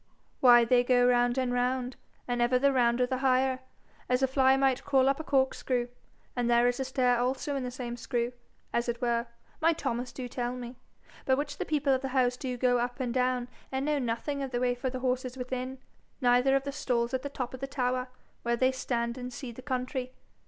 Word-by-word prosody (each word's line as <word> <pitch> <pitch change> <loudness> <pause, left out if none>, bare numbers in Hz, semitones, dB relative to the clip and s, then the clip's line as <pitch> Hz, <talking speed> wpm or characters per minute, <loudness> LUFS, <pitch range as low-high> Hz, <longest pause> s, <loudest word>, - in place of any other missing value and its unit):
'Why, 240 -2 +7
they 245 +1 +4
go 245 0 +4
round 245 0 +3
and 255 -1 0
round, 250 0 0 0.3
and 245 -1 -1
ever 240 +1 +3
the 280 +2 +3
rounder 245 -1 +3
the 255 0 -2
higher, 260 0 +2 0.5
as 250 +1 +2
a - - +5
fly 265 0 +4
might 270 -1 +2
crawl 270 -2 +3
up 275 +2 +2
a - - -4
corkscrew. 265 -3 0 0.5
And 245 -1 0
there 240 0 +4
is 245 +1 0
a 265 - -1
stair 250 -2 +2
also 265 +3 -1
in 275 - -1
the 250 - -3
same 245 -1 -5
screw, 240 0 -2 0.4
as 235 0 0
it 235 0 -2
were, 235 -1 0 0.3
my 330 +1 +4
Thomas 250 -5 -3
do 255 -2 -6
tell 245 0 -3
me, 245 0 -8 0.5
by 260 - +5
which 290 +1 -4
the - - -1
people 290 -3 +1
of 260 - 0
the 270 - -2
house 250 -1 +3
do 250 -1 -4
go 245 0 +2
up 245 +2 -3
and 245 -3 -2
down, 250 -1 +1 0.2
and 265 +1 -1
know 300 -1 +1
nothing 260 +4 -2
of 270 - -3
the 245 -1 -2
way 250 0 +2
for 245 +2 -3
the 255 0 -5
horses 255 0 -1
within, 255 +1 -4 0.4
neither 250 +1 +4
of 270 - +1
the 280 - -3
stalls 245 -4 -1
at 260 - 0
the 285 - -5
top 255 -3 -5
of 260 - -7
the 275 - -4
tower, 255 -1 -1 0.3
where 235 0 0
they 255 +2 +3
stand 240 -2 -2
and 250 0 -6
see 250 0 -7
the 235 - -10
country. 255 -1 -3
255 Hz, 225 wpm, -29 LUFS, 245-265 Hz, 0.5 s, Why